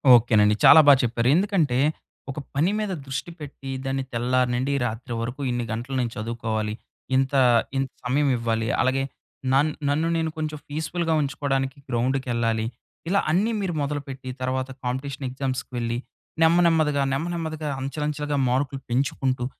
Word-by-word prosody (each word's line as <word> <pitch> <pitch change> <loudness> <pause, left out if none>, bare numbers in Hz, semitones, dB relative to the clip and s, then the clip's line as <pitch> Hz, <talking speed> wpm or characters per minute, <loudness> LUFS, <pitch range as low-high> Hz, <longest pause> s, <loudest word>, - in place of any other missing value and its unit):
ఓకేనండి. 110 -3 +4
చాలా 160 - +10
బా 145 - +10
చెప్పారు. 120 0 0
ఎందుకంటే, 175 -9 +2 0.5
ఒక 140 - -6 0.2
పని 165 +7 +3
మీద 210 -2 -2
దృష్టి 135 +6 -4
పెట్టి 135 -2 -8 0.2
దాన్ని 135 0 -1
తెల్లారి 125 +1 +1
నుండి, 135 +3 0
రాత్రి 115 +1 -4
వరకు 125 +5 -4
ఇన్ని 120 0 -1
గంటలు 120 +4 -4
నేను 120 -2 -1
చదువుకోవాలి. 110 -1 -2 0.4
ఇంతా 135 +1 +3 0.4
ఇంత 135 0 0
సమయమిఇవ్వాలి. 125 -4 +1
అలాగే, 135 +1 +1 0.5
నన్ 145 +3 +4 0.2
నన్ను 155 +3 +1
నేను 160 -1 0
కొంచం 155 -1 -3
పీస్‌ఫుల్‌గా 160 +2 -1
ఉంచుకోడానికి 135 -1 -1
గ్రౌండుకెళ్ళాలి. 120 -2 0 0.4
ఇలా 200 +1 +3
అన్ని 205 +7 +2
మీరు 180 -3 -2
మొదలుపెట్టి, 140 -2 -4
తర్వాత 130 0 -1 0.2
కాంపిటీషన్ 135 +2 -3
ఎగ్జామ్స్‌కి 130 0 -3
వెళ్ళి, 115 0 -1 0.5
నెమ్మ 165 +2 +5
నెమ్మదిగా, 155 -3 +2
నెమ్మ 155 +5 -1
నెమ్మదిగా 155 -2 -3
అంచెలంచెలుగా 150 +1 -2
మార్కులు 135 +1 -1
పెంచుకుంటూ, 130 -1 0
135 Hz, 140 wpm, -24 LUFS, 125-150 Hz, 0.5 s, చాలా